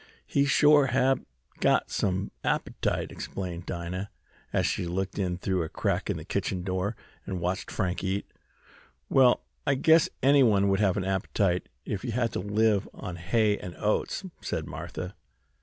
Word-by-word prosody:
"He 140 - +2
shore 145 0 +5
hab 135 0 +2 0.4
got - - +2
some 95 0 -1
appetite!" - - -1
exclaimed 90 -2 -5
Dinah, 90 +3 -4 0.4
as - - +1
she 85 - -1
looked 95 +3 -2
in 90 -2 0
through 95 0 0
a 80 - -3
crack - - -1
in - - 0
the - - -8
kitchen 90 -1 -2
door, 95 +3 -1 0.3
and 95 -2 -3
watched 90 +3 -2
Frank 90 -3 -2
eat. 95 +1 -1 0.8
"Well, 130 -2 +5 0.2
I 140 - +4
guess 160 +3 +5
anyone 120 -8 +5
would 95 0 +2
have 100 -3 +2
an 95 - -1
appetite 95 -1 0 0.2
if 100 - -3
they 125 - -4
had 115 0 0
to - - -1
live 105 +1 +1
on 90 -5 -6
hay 105 +4 +2
and 90 - -7
oats," 105 - 0 0.2
said - - -3
Martha. 90 +1 -6
100 Hz, 160 wpm, -28 LUFS, 90-115 Hz, 0.8 s, shore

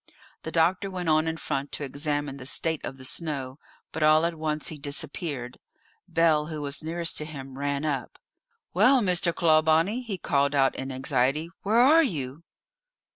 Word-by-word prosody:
The 160 - -6
doctor 175 +4 +2
went 180 -3 -3
on 155 +1 +3
in 160 0 -2
front 140 -2 -3
to - - -2
examine 145 0 -3
the 130 - -9
state 160 +3 +1
of 135 - -6
the 130 - -8
snow, 140 -3 -2 0.3
but 160 - -5
all 155 +1 +5
at 170 - 0
once 155 -1 -3
he 155 - -8
disappeared. 145 -3 -3 0.5
Bell, 160 -2 +2
who 155 -1 -5
was 140 -1 -2
nearest 170 +1 -2
to 150 - -2
him, 135 -3 -9
ran 140 +1 -1
up. 135 -5 -3 0.6
"Well, 250 +8 +5
Mr. 180 -3 +2
Clawbonny," 165 +7 +3
he 220 -6 -5
called 140 -4 +1
out 135 -1 +3
in 135 0 -6
anxiety, 135 +4 0
"where 215 +3 +1
are 295 +7 +7
you?" 150 - -3
155 Hz, 175 wpm, -26 LUFS, 140-170 Hz, 0.6 s, are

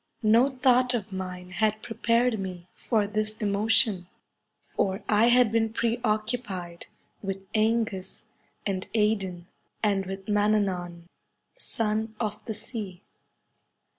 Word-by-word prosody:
No 230 +5 +5
thought 255 -1 +3
of 215 -3 -4
mine 180 -1 -6
had 215 +2 0
prepared 230 0 +1
me 180 -2 -6
for 220 -4 0
this 215 +1 -2
emotion, 205 -2 +2 0.7
for 190 +1 0
I 215 +2 +4
had 245 -2 +5
been 225 -1 +2
pre 230 +1 0
occupied 215 -6 -2 0.3
with 195 -1 -5
/Engus 215 -4 0 0.4
and 190 -2 -2
Edain, 195 -5 +1 0.4
and 195 -3 +1
with 195 0 -6
Mannanan, 200 -5 +1 0.6
son 220 - -1
of 215 -2 -3
the 220 - -4
sea. 205 -4 -7
215 Hz, 115 wpm, -27 LUFS, 190-225 Hz, 0.7 s, No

